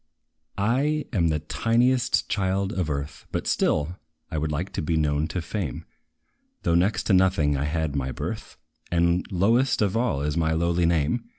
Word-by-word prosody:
I 135 +8 +1
am 85 -6 +2
the 80 -1 +1
tiniest 120 +9 +1
child 95 0 0
of 90 -4 -1
earth, 70 0 -5
But - - -2
still, 80 +5 0 0.3
I 80 - -1
would 75 +1 -2
like 80 +6 -3
to - - -2
be 80 +1 0
known 75 0 +1
to 90 0 -4
fame, 90 - -4 0.8
Though 85 - +2
next 90 +5 +2
to 100 - +1
nothing 90 -6 +3
I 70 +1 -1
had 80 -1 -1
my 65 -2 -1
birth, - - -6 0.3
And 85 +1 +2
lowest 115 +8 +2
of 100 -2 +1
all 115 - 0
is 75 0 -1
my 80 -1 +1
lowly 85 +1 +1
name. 85 +8 +1
85 Hz, 175 wpm, -25 LUFS, 75-100 Hz, 0.8 s, nothing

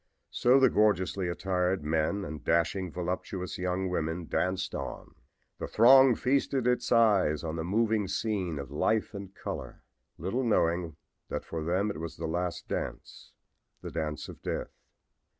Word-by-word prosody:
So 125 +3 +4
the 135 - +5
gorgeously 100 -3 +2
attired 90 0 0
men 80 +6 0
and 75 0 -7
dashing, 85 +2 +1
voluptuous 90 +1 -4
young 90 +1 -1
women 85 -1 -2
danced 95 +3 -1
on. - - -6 0.5
The - - -3
throng 130 +2 +7
feasted 135 0 +1
its 125 0 +1
eyes 100 -10 +4
on 80 -1 -3
the 80 - -3
moving 110 +2 +1
scene 95 -4 -2
of 70 -2 -6
life 110 +9 0
and 100 -2 -7
color, - - -6 0.3
little 95 - -2
knowing 85 -7 +1 0.3
that - - -4
for 80 -1 -4
them 95 +6 0
it 100 - -7
was 85 0 -6
the 80 - -4
last 85 +2 -3
dance - - -5 0.5
the - - -6
dance 75 -2 -3
of - - -11
death! - - -3
90 Hz, 150 wpm, -29 LUFS, 85-105 Hz, 0.5 s, throng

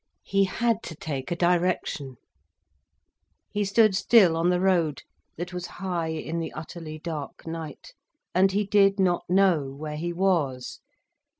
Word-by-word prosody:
He 195 0 +2
had 230 +3 0
to 160 - -7
take 140 -4 -5
a 175 - -1
direction. 175 -6 0 1.4
He 210 - 0
stood 205 0 +4
still 195 -4 +5
on 165 +2 +2
the 180 0 +2
road, 175 -6 +1 0.3
that 175 +2 -5
was 180 -1 -4
high 175 -3 -2
in 160 +1 -3
the 165 - -4
utterly 155 0 -7
dark 155 -3 -6
night, 165 - -7 0.4
and 190 +2 +4
he 205 +2 0
did 195 0 +4
not 175 -2 +1
know 180 -7 +3
where 150 +2 -6
he 175 +2 -3
was. 165 -9 0
175 Hz, 145 wpm, -26 LUFS, 160-190 Hz, 1.4 s, still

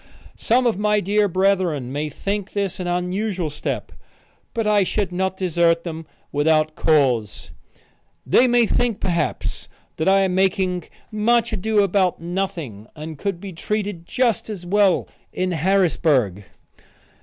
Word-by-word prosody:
Some 250 +3 +2
of 225 -5 +1
my 210 0 +2
dear 205 +2 +2
brethren 185 -8 +1
may 150 +2 -2
think 200 +6 -4
this 200 -2 -2
an 180 - -3
unusual 180 -1 -2
step, 150 - -4 0.6
but 225 -2 -2
I 210 -1 +4
should 200 +1 -1
not 190 +1 -1
desert 170 -2 +2
them 160 -2 -6 0.2
without 155 +1 +2
cause. 130 -10 +1 0.7
They 240 - +4
may 240 -1 +4
think, 235 -1 0
perhaps, 170 -3 -2 0.3
that 160 - -1
I 195 0 +5
am 190 -1 +1
making 185 -2 +1 0.3
much 230 +2 +2
ado 215 +1 +2
about 190 -2 +1
nothing 170 - -4
and 155 -1 -8
could 195 -4 -2
be 195 0 -8
treated 200 -1 -3
just 240 -4 0
as 195 -5 -6
well 195 0 +2 0.2
in 185 0 -1
Harrisburg. 155 - +1
185 Hz, 140 wpm, -22 LUFS, 165-205 Hz, 0.7 s, I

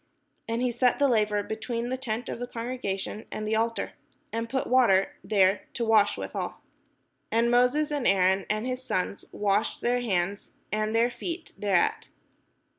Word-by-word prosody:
And 230 +2 -1
he 250 - +2
set 245 +1 +2
the 285 - +4
laver 210 -4 +2
between 230 +3 -3
the 260 - 0
tent 245 -2 -4
of - - -4
the 245 - -4
congregation 230 -4 -4
and 215 - -4
the 215 +1 0
altar, 230 +1 0 0.4
and 230 0 -2
put 265 +1 -1
water 235 -7 +4
there, 195 -1 +2
to 235 - -1
wash 215 -2 +4
withal. - - -4 0.8
And 230 +1 +3
Moses 250 +5 +3
and 290 -4 0
Aaron 190 0 +3
and 215 +2 0
his 255 0 -3
sons 185 -3 -2
washed 205 +1 0
their 245 +1 +1
hands 195 -3 -1 0.2
and 215 +1 0
their 235 +2 +3
feet 330 +7 -6
thereat. 195 -4 +1
230 Hz, 165 wpm, -27 LUFS, 205-245 Hz, 0.8 s, the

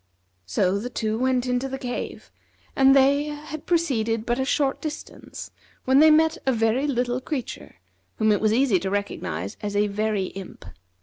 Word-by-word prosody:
So 185 - +1
the 245 +4 -5
two 220 -2 -2
went 255 -1 +1
into 250 +1 -1
the 270 - -4
cave, 245 -2 -6 0.4
and 270 0 +5
they 280 +2 +4
had 300 0 -7
proceeded 230 -10 0
but 240 +1 -1
a 265 - 0
short 275 0 0
distance 305 -1 -8 0.3
when 265 +1 +4
they 315 +1 +7
met 315 +1 +4
a - - +5
very 230 +4 +1
little 250 -2 -1
creature, 265 -2 -6 0.4
whom 215 0 +2
it 205 - +1
was 215 -1 +3
easy 235 -4 +3
to 190 +2 -3
recognize 100 - -3
as 205 -1 -4
a 205 +1 +3
Very 210 -1 -1
Imp. 195 -1 -10
245 Hz, 175 wpm, -24 LUFS, 215-275 Hz, 0.4 s, they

